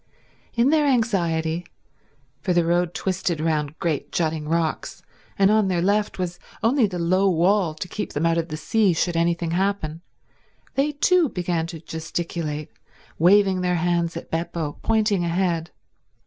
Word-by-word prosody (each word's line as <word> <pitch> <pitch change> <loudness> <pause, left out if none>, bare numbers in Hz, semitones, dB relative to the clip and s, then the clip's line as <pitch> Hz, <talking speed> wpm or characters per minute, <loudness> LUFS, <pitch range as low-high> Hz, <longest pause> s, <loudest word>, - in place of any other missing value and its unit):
In 240 +4 +3
their 305 -2 +3
anxiety, 175 - +1 0.8
for 180 - 0
the 175 -1 +3
road 175 0 +1
twisted 185 -3 -1
round 155 -2 -1
great 165 -6 -2
jutting 155 -2 -1
rocks, 165 -1 -2 0.3
and 195 +1 +4
on 215 -2 +3
their 180 -2 0
left 205 +2 +1
was 180 -1 -3 0.2
only 235 0 +3
the 180 -2 -5
low 185 +3 +2
wall 180 -1 +2
to 170 - -5
keep 210 - -5
them 150 +3 0
out 165 0 +2
of 165 - -2
the 155 -2 -5
sea 195 +5 +2
should 170 +1 0
anything 170 0 0
happen, 175 -3 -1 0.7
they 285 +2 +1
too 335 +2 +3
began 175 -4 -2
to 165 -1 -8
gesticulate, 160 -1 -4 0.5
waving 190 +2 +4
their 180 0 +1
hands 170 -1 0
at - - -9
Beppo, 165 -2 -3
pointing 215 -4 +1
ahead. 170 -1 0
175 Hz, 155 wpm, -23 LUFS, 165-195 Hz, 0.8 s, and